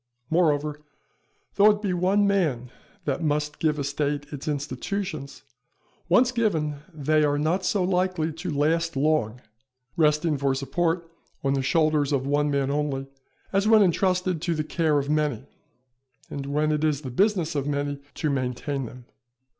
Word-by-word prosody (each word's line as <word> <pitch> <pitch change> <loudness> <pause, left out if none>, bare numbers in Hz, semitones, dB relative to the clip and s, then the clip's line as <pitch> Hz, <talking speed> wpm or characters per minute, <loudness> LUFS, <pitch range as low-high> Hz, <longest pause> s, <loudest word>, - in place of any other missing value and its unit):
Moreover, 150 -3 +2 0.7
though 205 +1 +6
it 210 0 +1
be 195 -3 0
one 190 +3 +2
man 155 -12 0 0.3
that - - -1
must 150 -1 -1
give 155 -2 +1
a 145 - -2
State 145 +1 -2
its 145 +1 -7
institutions, 145 +2 -4 0.7
once 245 +8 +5
given 160 - 0
they 155 0 +1
are 145 -1 +2
not 165 +6 0
so 190 0 +1
likely 180 -3 0
to 170 +3 -5
last 160 +2 +1
long 135 -5 +1 0.5
resting 150 -2 +2
for 135 -1 +1
support 165 +5 -1 0.4
on 135 0 +2
the 135 - +1
shoulders 155 0 +2
of 135 -2 0
one 145 +1 +1
man 140 -1 0
only, 145 -2 -1 0.5
as 195 +2 +2
when 220 -1 +7
entrusted 180 -1 +1
to 170 -1 0
the 155 - -1
care 155 -1 +1
of 140 -1 -1
many, 150 -6 0 0.9
and 140 -1 -5
when 150 +2 +1
it 150 0 0
is 150 -2 +1
the 130 -4 -6
business 190 - +1
of 140 -1 -2
many 145 -1 -2
to 155 -3 -1
maintain 130 0 -2
them. 125 +1 -12
150 Hz, 160 wpm, -25 LUFS, 140-175 Hz, 0.9 s, when